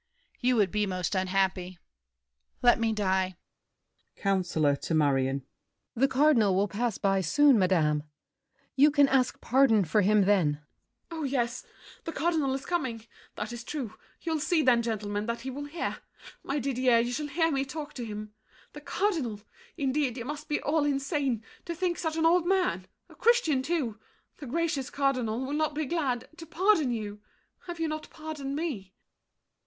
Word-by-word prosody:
You 250 +1 +2
would 205 -5 +2
be 210 -1 0
most 185 -1 -2
unhappy. 185 -1 0 0.9
Let 240 -1 +6
me 225 -1 +1
die! 190 -3 0 0.8
COUNCILOR 175 -7 +1
(to 160 - -2
Marion). 135 -3 +1 0.5
The 265 +4 +3
Cardinal 260 -8 +4
will 200 +2 +2
pass 225 +2 -2
by 195 -1 +1
soon, 285 +4 +4
madame! 160 -6 +2 0.7
You 285 +2 +6
can 285 -1 +4
ask 265 -2 +1
pardon 245 -7 +4
for 205 +7 +2
him 210 +2 +4
then. 185 -7 +3
MARION. 150 +1 -12 0.5
Oh, 325 -1 -5
yes! 245 -4 -1 0.4
The 330 - -3
Cardinal 320 -4 0
is 270 - -6
coming—that 240 -7 -5
is 240 0 -7
true. 255 -4 -5 0.3
You'll 320 -2 -1
see, 320 +1 +2
then, 245 -3 +4
gentlemen, 210 -2 -3
that 235 0 -3
he 265 +2 -5
will 285 +3 -6
hear! 310 +4 -4 0.4
My 280 - -3
Didier, 255 -3 +2
you 235 +1 +1
shall 300 +3 -2
hear 325 +3 +1
me 270 -2 +1
talk 290 +2 -7
to 245 - -6
him! 215 -1 -7 0.4
The 295 - -9
Cardinal! 295 - -1 0.4
Indeed, 270 -2 0
you 235 - -5
must 295 +2 -6
be 295 - +1
all 300 +1 +1
insane, 275 - 0 0.2
To 340 - -4
think 350 0 -1
such 320 -2 -2
an 325 - +2
old 345 +1 +4
man—a 375 -1 -2
Christian 445 - +3
too, 260 -8 -2 0.4
The 290 - -8
gracious 295 -2 -1
Cardinal—will 260 -1 -1
not 305 0 0
be 310 0 -1
glad 265 -6 -1
To 330 -1 -10
pardon 355 -4 +3
you. 210 -3 -5 0.5
Have 345 -1 -6
you 325 - 0
not 310 0 -5
pardoned 300 -3 -6
me? 235 - -4
260 Hz, 165 wpm, -28 LUFS, 210-300 Hz, 0.9 s, Let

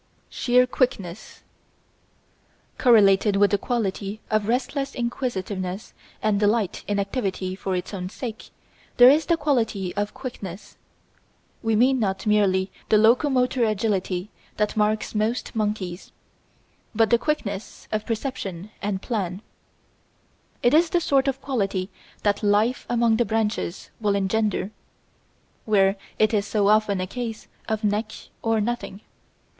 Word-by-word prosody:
Sheer 250 0 +3
Quickness 215 -7 -2 1.4
Correlated 205 -4 +5
with 200 0 +4
the 205 - +2
quality 210 -4 -2
of 215 -1 +1
restless 270 +3 -1
inquisitiveness 205 -6 -3 0.3
and 215 -2 +2
delight 210 -2 +1
in 205 - 0
activity 195 -3 -2
for 190 -1 -3
its 180 +3 -4
own 180 -2 -4
sake 225 +1 -7 0.5
there 245 +1 +9
is 305 +3 +2
the 335 - +3
quality 225 - 0
of 205 +1 -2
quickness. 210 -8 -8 0.9
We 225 -1 +1
mean 255 +4 +4
not 195 -1 -1
merely 195 -3 +2 0.2
the 215 - +5
locomotor 250 +3 +3
agility 200 -3 -1 0.3
that 210 0 0
marks 215 0 0
most 220 +4 -1
monkeys, 205 -5 -3 0.8
but 225 +1 +4
quickness 220 -9 -3
of 215 0 -1
perception 215 -5 -4
and 200 -1 -2
plan. 195 -4 -3 1.2
It 245 - +4
is 325 +2 +5
the 350 - +2
sort 275 -4 +2
of 270 0 -1
quality 195 -7 -2 0.3
that 205 -1 +1
life 210 +4 +2
among 235 -2 +3
the 240 - +2
branches 215 -4 -2
will 205 -2 +1
engender, 200 0 0 0.9
where 195 -2 +3 0.2
it 215 +1 +3
is 205 -1 +1
so 205 -1 +2
often 210 -2 +3
a 185 - -1
case 230 +2 -6 0.2
of 220 0 -1
neck 210 +1 0 0.3
or 225 -1 +1
nothing. 215 -2 -3
215 Hz, 130 wpm, -24 LUFS, 200-240 Hz, 1.4 s, there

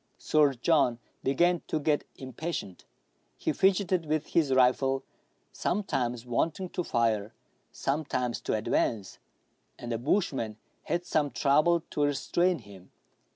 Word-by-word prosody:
Sir 150 -3 +3
John 125 -2 +2 0.3
began 170 +6 +2
to 155 - -1
get 150 0 0
impatient. 130 - -6 0.5
He - - -1
fidgeted 185 -3 +2
with 155 0 0
his 155 -5 +2
rifle, 130 +1 +3 0.5
sometimes 125 - -1
wanting 165 +9 -1
to 180 - -3
fire, 115 -6 0 0.4
sometimes 135 -4 -2
to - - -1
advance; 110 -2 -1 0.6
and 120 - -6
the 115 - -1
bushman 125 - 0 0.3
had 170 +2 -1
some 150 -4 +1
trouble 155 +5 +3
to - - -2
restrain 175 +5 +1
him. 100 -5 -14
140 Hz, 120 wpm, -29 LUFS, 120-170 Hz, 0.6 s, Sir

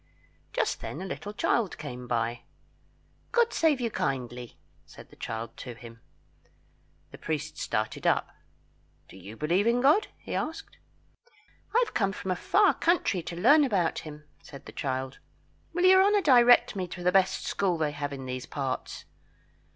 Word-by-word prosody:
Just - - -1
then 150 - -6
a 190 - -5
little 200 +2 -6
child 210 -1 0
came 125 -4 -7
by. 115 0 -1 0.9
"God 475 -1 +2
save 310 -5 +2
you 235 -2 -2
kindly," 125 - -3 0.3
said - - -15
the - - -15
child 115 0 -6
to 125 -2 -8
him. 115 -1 -13 1.1
The - - -12
priest 155 -3 -4
started 110 -1 -2
up. - - +2 0.8
"Do - - -15
you 100 +4 -11
believe 175 +8 +1
in 235 +1 +3
God?" 295 +11 +4
he - - -8
asked. 315 +2 -4 1.0
"I 485 - +5
have 430 - -11
come 195 -2 +1
from 190 - -4
a - - +1
far 400 - +3
country 335 - +1
to 170 +1 -7
learn 290 - +6
about 195 -11 0
him," 150 -1 -10 0.2
said 140 -2 -12
the - - -9
child. 130 -2 -4 0.5
"Will 350 +2 +1
your 375 +1 +7
honour 410 +1 +3
direct 245 -6 +6
me 185 -2 -3
to 180 0 -8
the 180 - +3
best 190 0 +2
school 185 -4 0
they 155 -2 0
have 145 -1 -4
in 135 -2 -7
these 130 0 -5
parts?" 135 -3 -4
175 Hz, 165 wpm, -28 LUFS, -, 1.1 s, your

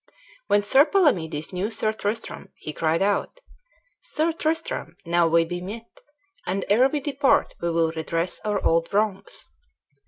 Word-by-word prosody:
When 205 - +3
Sir 265 +7 +6
Palamedes 180 - +1
knew 185 +4 -1
Sir 220 -1 0
Tristram, 215 +1 -4
he 155 - -7
cried 165 +3 +1
out, 205 - -1 0.6
"Sir 330 -9 0
Tristram, 320 0 -2
now 170 0 +3
we 165 0 +3
be 175 +1 -5
met, 220 +5 -9 0.5
and 190 +1 -1
ere 250 +6 +5
we 295 - -1
depart 280 -1 +1
we 170 - 0
will 165 -1 +1
redress 165 +2 -2
our 210 -2 -1
old 165 +1 +2
wrongs." 210 -2 -1
200 Hz, 150 wpm, -24 LUFS, 165-250 Hz, 0.6 s, Sir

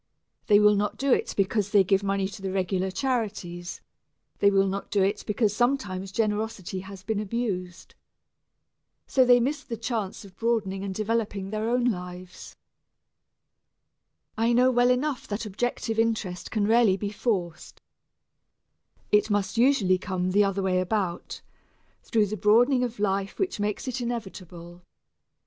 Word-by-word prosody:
They 205 -2 +6
will 210 0 +6
not 205 0 -1
do 270 -1 +2
it - - 0
because 200 +1 +1
they 200 -2 +5
give 195 +1 +2
money 195 -1 0
to 200 +1 -10
the 190 -1 -3
regular 190 0 -1
charities 190 -6 -3 0.6
they 200 - +5
will 195 -1 +3
not 195 +1 -3
do 200 -2 +2
it 200 +2 0
because 210 0 +1
sometimes 215 -7 -1
generosity 210 -3 -2
has 190 0 -10
been 215 +1 -2
abused. 190 -5 -4 1.1
So 260 - +3
they 245 -1 +6
miss 285 +4 -1
the 235 -4 -6
chance 220 -4 -4
of 190 - -15
broadening 215 -5 -1
and 195 -1 -4
developing 210 -2 -2
their 215 +1 -2
own 245 0 +1
lives. 180 -4 -5 1.8
I 230 +2 +2
know 250 +2 +4
well 245 0 +3
enough 255 +1 0
that 210 +2 -4
objective 225 +2 -2
interest 220 -6 -1
can 215 -2 0
rarely 220 -3 +4
be 205 +1 -4
forced 185 -7 -3 1.3
it 210 +1 +3
must 205 0 0
usually 230 -8 +3
come 185 -1 -2
the 205 +2 +4
other 195 -1 -1
way 185 -1 +1
about 185 -2 -2 0.6
through 220 -3 +1
the 210 +1 -4
broadening 245 +6 +4
of 240 -1 -3
life 195 -1 -1
which 380 - -2
makes 210 +5 -2
it 255 0 -3
inevitable. 185 -7 -6
205 Hz, 150 wpm, -26 LUFS, 190-230 Hz, 1.8 s, They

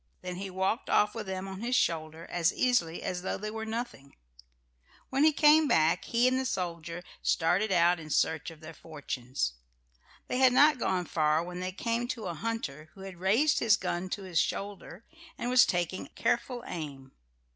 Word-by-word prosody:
Then 180 -1 -5
he 195 +1 -5
walked 190 +5 -1
off 210 0 +3
with 220 -3 -6
them 190 0 -4
on 190 +1 -7
his 245 +2 0
shoulder 160 -4 -1
as 175 0 +1
easily 225 -10 0
as 180 -1 -3
though 185 - -3
they 215 +1 -5
were 220 0 -5
nothing. 220 - -6 1.0
When 270 +2 +2
he 315 - +6
came 305 +1 +5
back 160 - +2
he 240 +2 +2
and 255 0 +2
the 265 - -2
soldier 170 -3 -4 0.2
started 180 +6 +1
out 175 -1 +4
in 155 -1 -10
search 160 +2 +1
of 165 -1 -14
their 160 +1 -9
fortunes. 130 - -4 0.7
They 250 - -1
had 260 -1 +6
not 290 +1 +5
gone 185 -5 0
far 155 0 +1
when 180 +1 -7
they 185 0 -3
came 230 +5 -2
to 235 -3 -5
a 175 - -3
hunter 155 -6 -4
who 195 - -12
had 190 -2 -9
raised 225 +12 +3
his 215 -3 +4
gun 175 0 -3
to 200 - -4
his 180 -3 0
shoulder 200 0 -4 0.3
and 245 - -2
was 255 -1 +6
taking 175 +1 -2
careful 245 0 -1
aim. 140 -6 -7
185 Hz, 190 wpm, -29 LUFS, 165-230 Hz, 1.0 s, he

